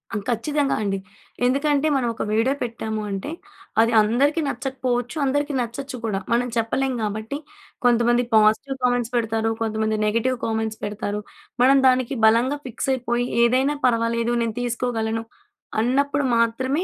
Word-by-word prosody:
ఆ! - - +1
ఖచ్చితంగా 280 +5 0
అండి. 195 -1 -1 0.5
ఎందుకంటే 285 +3 +2
మనం 250 -3 +1
ఒక - - -4
వీడియో 225 +5 +2
పెట్టాము 220 -2 -4
అంటే 195 +10 -4 0.5
అది 230 +1 +3
అందరికీ 280 +9 +2
నచ్చకపోవచ్చు, 255 -2 -2
అందరికీ 290 +2 0
నచ్చొచ్చు 255 +3 -5
కూడా. 195 -3 -1
మనం 245 +1 +2
చెప్పలేం 260 +4 0
కాబట్టి 220 +6 -3 0.5
కొంతమంది 240 0 +4
పాజిటివ్ 220 +6 +3
కామెంట్స్ 245 -1 +1
పెడతారు, 225 -1 0
కొంతమంది 220 -1 0
నెగెటివ్ 230 +4 +1
కామెంట్స్ 220 -1 -2
పెడతారు. 205 0 -3 0.4
మనం 270 +2 +6
దానికి 255 +1 +2
బలంగా 240 +6 +3
ఫిక్స్ 255 +2 -4
అయిపోయి 245 -1 -1 0.2
ఏదైనా 260 +5 +2
పర్వాలేదు 230 0 +1
నేను 225 -2 -3
తీసుకోగలను 230 -2 -2 0.6
అన్నప్పుడు 280 +4 +1
మాత్రమే 260 +7 +1
240 Hz, 130 wpm, -23 LUFS, 225-265 Hz, 0.6 s, మనం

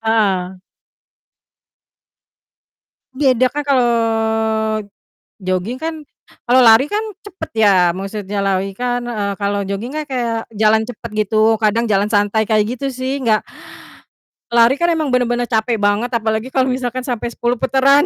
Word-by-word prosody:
Ah. 195 -5 0 2.6
Beda 260 -2 +2
kan, 295 - -1
kalau 255 -3 +3 1.5
joging 185 +7 -2
kan 320 -1 -4 0.4
kalau 255 +2 +4
lari 230 +2 +7
kan 420 - +1 0.2
cepet 380 -6 -8
ya, 185 -4 +5
maksudnya 200 0 -4
lari 195 0 -1
kan, 245 0 -1
e 220 -3 -3 0.2
kalau 200 0 -1
joging 205 +8 -5
kan, 310 - -2
kayak 240 -5 -2
jalan 220 +1 +3
cepat 235 -1 -9
gitu, 220 +2 +2
kadang 225 +2 +1
jalan 200 -1 +2
santai 205 +1 +2
kayak 215 +3 0
gitu 275 - -4
sih, 260 +2 -3
enggak 215 -2 +2 1.1
lari 235 +3 +5
kan 345 0 +2
emang 315 -3 -1
bener-bener 245 -1 0
capek 225 0 0
banget, 205 +5 +1
apalagi 220 +2 -1
kalau 260 -1 +2
misalkan 255 0 -2
sampai 240 -2 -4
10 240 +1 -1
putaran. 270 +4 +3
230 Hz, 135 wpm, -18 LUFS, 210-255 Hz, 2.6 s, lari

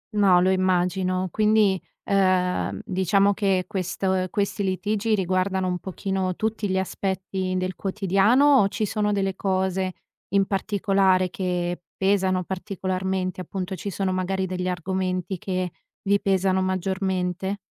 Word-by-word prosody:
No, 190 -4 +5
lo 185 +1 +3
immagino. 185 0 +1
Quindi, 210 -3 +3 0.2
ehm, 185 0 +1
diciamo 195 0 +2
che 190 -3 +1
questo 190 -1 -1
ehm, 185 0 0
questi 205 0 -1
litigi 210 +3 0
riguardano 185 0 0
un 180 -1 -1
pochino 190 -1 -2
tutti 220 -2 -2
gli 190 - +1
aspetti 190 0 -2
del 185 0 -2
quotidiano 210 +9 +3
o 195 - +4
ci 215 +2 -2
sono 210 0 0
delle 195 -2 0
cose 190 -1 -1 0.4
in 195 0 +4
particolare 195 -2 +1
che 175 -2 -2 0.2
pesano 190 -1 +2
particolarmente? 185 -1 -3
Appunto, 190 0 -5
ci 200 +3 -5
sono 190 0 -1
magari 190 +1 -1
degli 185 0 -3
argomenti 185 0 -2
che 185 -2 -2 0.3
vi 200 0 +2
pesano 190 -1 +2
maggiormente? 185 0 -1
190 Hz, 130 wpm, -24 LUFS, 185-195 Hz, 0.4 s, No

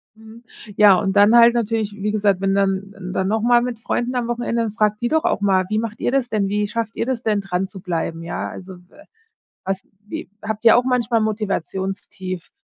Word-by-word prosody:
Mhm. 220 +1 -15 0.3
Ja, 205 -2 +7
und 195 -2 -1
dann 205 +3 +6
halt 235 0 +7
natürlich, 225 -2 -1
wie 210 +1 -2
gesagt, 200 -3 +1
wenn 195 0 +1
dann 195 0 0 0.2
dann 190 0 0
nochmal 230 +3 +3
mit 240 -2 -4
Freunden 240 +2 -2
am 245 -2 -1
Wochenende, 240 -1 -1
dann 220 - -3
fragt 210 0 0
die 240 - +1
doch 315 +4 +1
auch - - 0
mal: 190 -2 +2
„Wie 215 0 0
macht 220 -1 -5
ihr - - 0
das 265 -2 0
denn? 210 -4 0
Wie 205 +1 0
schafft 225 +1 -4
ihr - - -1
das 250 -1 -3
denn 210 -2 +1
dran 190 -1 -2
zu 195 0 -11
bleiben? 165 -3 -3
Ja, 170 +1 -4
also, 190 0 -9
w - - -28
äh, 305 - -17 0.6
was 195 0 -3 0.2
wie - - -6
habt 220 +1 -5
ihr 225 - +8
auch 245 - +3
manchmal 245 -3 +1
Motivationstief?“ 190 -3 -4
210 Hz, 220 wpm, -21 LUFS, 195-230 Hz, 0.6 s, ihr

